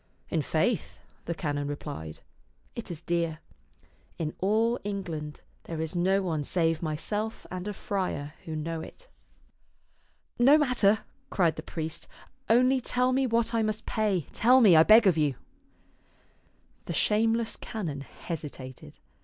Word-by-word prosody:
" - - -35
In - - +2
faith," - - 0 0.3
the 170 - -3
canon 145 -3 -2
replied, 145 - -6 0.3
" - - -38
it 235 - -6
is 170 -1 -7
dear. 170 -2 -1 0.8
In 155 -2 -3
all 220 +5 +2
England 170 -7 -5 0.2
there 165 -2 -5
is 160 +1 -3
no 190 +3 +2
one 160 -5 -1
save 165 +1 0
myself 205 +8 -3
and 185 +1 -5
a 210 - -3
friar 180 -8 -3
who 160 - -5
know 160 +1 -3
it." - - -12 1.3
"No 270 +5 +7
matter," 245 -8 +3 0.3
cried 170 -4 +2
the - - -6
priest, 160 0 -5 0.2
" 265 0 -36
only 255 +3 +4
tell 250 +1 +1
me 265 0 +2
what 230 0 +1
I 230 - +2
must 215 0 -2
pay. 205 -8 0
Tell 250 +3 +5
me, 205 -9 +7
I 160 - +9
beg 215 +6 +7
of 175 -5 +4
you." 145 -3 +1 1.5
The 170 - -4
shameless 225 +4 +2
canon 165 -11 -5
hesitated. 135 - -8
185 Hz, 150 wpm, -28 LUFS, 155-225 Hz, 1.5 s, I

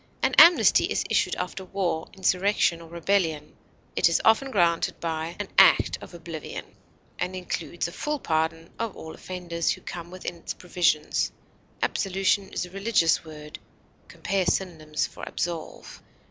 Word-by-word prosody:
An - - +2
amnesty 345 +1 +7
is - - -1
issued - - +2
after 180 +1 -4
war, 180 -4 -2
insurrection, 185 -2 +1
or 165 - -12
rebellion; 170 -3 -1 0.4
it - - +4
is 170 - +2
often 225 +5 +4
granted 170 -7 +1
by 165 0 -3
"an 205 - -3
act 195 - +5
of - - -11
oblivion," 165 -2 -7 0.5
and 180 +1 -2
includes 175 -1 -3
a - - -8
full 300 +10 -2
pardon 165 - -1
of 230 -3 -3
all 160 - -8
offenders 175 -2 -3
who - - -1
come 170 -1 -7
within 180 -1 -6
its 165 - -6
provisions. 170 -4 0 0.5
Absolution 195 0 +1
is - - -3
a 180 - -14
religious 195 -4 +2
word 150 -1 -10 0.5
(compare 190 -1 -2
synonyms 160 -5 -1
for - - -11
ABSOLVE). 170 -2 -5
175 Hz, 145 wpm, -26 LUFS, 165-190 Hz, 0.5 s, amnesty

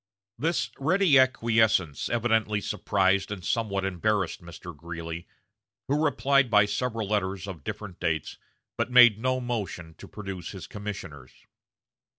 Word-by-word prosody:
This 165 +5 0
ready 160 0 +4
acquiescence 110 - +2
evidently 110 -2 +1
surprised 100 -1 +1
and 95 -4 -6
somewhat 100 -2 -1
embarrassed 95 0 -1
Mr. 85 0 -10
Greeley, 85 +1 -7 0.6
who 145 +3 +1
replied 140 -3 +2
by 105 -2 +5
several 110 +1 -2
letters 95 -2 -1
of 90 -7 -8
different 105 -3 -7
dates, 80 -1 -2 0.4
but - - -1
made 120 -4 +7
no 130 +2 0
motion 105 -9 -4
to - - -10
produce 95 -4 -7
his 95 - -8
commissioners. 95 -10 -8
105 Hz, 130 wpm, -27 LUFS, 90-120 Hz, 0.6 s, made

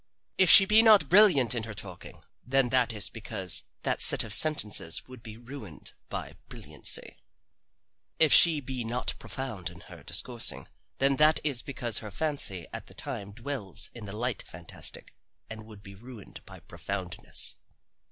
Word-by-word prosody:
If 185 -2 +4
she 195 - +11
be 210 +3 +4
not 215 -9 +3
brilliant 175 - +4
in 120 - -4
her 110 -2 -10
talking, 95 -3 -10 0.2
then 135 0 0
that 125 -2 +1
is 105 -4 -2
because 100 -5 +1 0.2
that - - -2
set - - +7
of 110 -2 -4
sentences 105 - +2
would 130 -2 -14
be 110 -2 -12
ruined 115 - -11 0.2
by - - -7 0.2
brilliancy. - - -3 1.0
If 160 -3 +4
she 160 -4 +5
be 130 -2 -7
not 120 +2 -3
profound 120 -10 -7
in - - -16
her - - -15
discoursing, 120 -2 0 0.3
then 135 0 0
that 155 +1 +3
is 140 -6 -2
because 120 -4 -3
her 110 - -10
fancy 105 - -3
at - - -9
the - - -15
time 100 0 -8
dwells 115 -3 -5
in 115 -3 -11
the 100 +1 -9
light 120 0 -3
fantastic 85 -1 -5 0.4
and 110 0 -11
would 105 -2 -15
be 100 - -13
ruined 115 +1 -14
by - - -14
profoundness. 95 -3 -1
120 Hz, 160 wpm, -26 LUFS, 105-140 Hz, 1.0 s, she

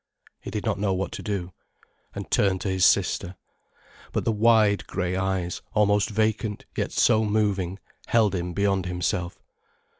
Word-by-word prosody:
He - - -8
did 105 +2 -4
not 105 -3 0
know 100 -2 +1
what 95 -1 -3
to - - -6
do, 95 -4 -4 0.6
and - - -7
turned 95 -2 +2
to 100 - -2
his 95 -1 +4
sister. 90 +2 +1 0.8
But - - -2
the - - +2
wide 110 -2 +3
grey 90 +1 -2
eyes, 95 -2 -2
almost 105 -1 +3
vacant 110 0 -1
yet - - -2
so 110 -2 +3
moving, 100 -4 0 0.3
held 110 -4 +3
him 90 -1 -3
beyond 95 -1 0
himself. 90 0 -2
100 Hz, 155 wpm, -25 LUFS, 90-105 Hz, 0.8 s, his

